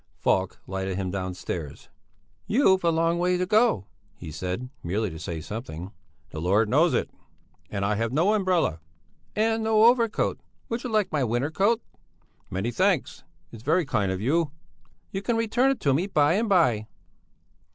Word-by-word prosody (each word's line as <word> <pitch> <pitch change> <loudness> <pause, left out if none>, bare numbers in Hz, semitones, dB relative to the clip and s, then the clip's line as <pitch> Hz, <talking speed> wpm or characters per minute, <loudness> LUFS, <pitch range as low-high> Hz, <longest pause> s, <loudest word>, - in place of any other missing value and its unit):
Falk 95 +1 0
lighted 95 0 -3
him 95 -2 -2
downstairs. 90 -5 -5 0.6
"You've 195 -6 +3
a 170 - +4
long 165 +1 +1
way 180 +1 +2
to 180 - 0
go," 210 - +3 0.3
he 80 - -9
said, 90 +10 -4
merely 100 +3 -1
to 80 - -8
say 80 0 -5
something. 95 - -7 0.4
"The 80 - -5
Lord 100 +6 +3
knows 155 +7 +3
it! - - -1 0.6
And 100 -1 -2
I 105 - +1
have 115 +1 -1
no 170 +10 +3
umbrella." 185 - +1 0.6
"And 225 +1 +1
no 220 -1 +4
overcoat. 235 -2 +2 0.3
Would 235 +1 -3
you 250 - -3
like 215 -3 +1
my 150 -4 +1
winter 120 +5 0
coat?" 215 +7 +2 0.7
"Many 95 +6 -2
thanks. 185 -1 0 0.3
It's 115 - -10
very 160 +7 +2
kind 105 -9 0
of 95 - -3
you." 150 - +1 0.6
"You 195 - -3
can 230 +2 0
return 235 +4 +2
it 270 - 0
to 140 - +3
me 170 +8 +1
by 150 -5 +3
and 215 +3 0
by." 125 - +3
150 Hz, 170 wpm, -26 LUFS, -, 0.7 s, a